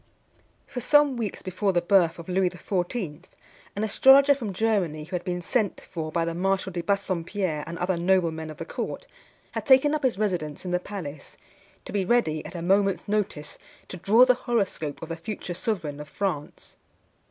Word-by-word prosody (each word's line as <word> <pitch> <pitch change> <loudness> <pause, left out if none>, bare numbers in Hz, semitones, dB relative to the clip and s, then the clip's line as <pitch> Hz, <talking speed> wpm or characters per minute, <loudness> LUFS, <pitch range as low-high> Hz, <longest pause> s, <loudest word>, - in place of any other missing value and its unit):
For 250 - -6
some 290 +1 +4
weeks 225 -4 -4
before 190 +1 -1
the 175 - +3
birth 175 -2 +3
of 170 - -10
Louis 185 0 +2
XIV., 180 -2 -3 0.5
an 205 - -2
astrologer 270 +6 +6
from 240 -7 -4
Germany, 185 -7 0
who 180 +4 -6
had 175 - -3
been 180 -1 -3
sent 215 0 0
for 160 -2 -6
by 165 0 0
the 170 - -2
Marshal 190 +2 0
de 175 -1 -3
Bassompierre 185 -4 -1
and 170 0 -6
other 180 +1 0
noblemen 170 -3 +1
of 155 - -9
the - - -6
court, - - -5 0.5
had - - -4
taken 275 +2 +6
up 305 - 0
his 255 -7 +1
residence 180 -7 -2
in 180 - -3
the 180 - +2
palace, 165 -8 -8 0.5
to - - -8
be 200 -2 +1
ready, 180 -8 +1
at - - -11
a 170 - -4
moment's 195 +1 +2
notice, 200 -8 -2 0.3
to 180 - -6
draw 220 +8 +6
the 255 - +5
horoscope 205 - -2
of 165 - -7
the 165 - -3
future 175 +1 -6
sovereign 170 -7 -3
of 150 0 -8
France. 175 -7 -4
185 Hz, 185 wpm, -26 LUFS, 165-210 Hz, 0.5 s, astrologer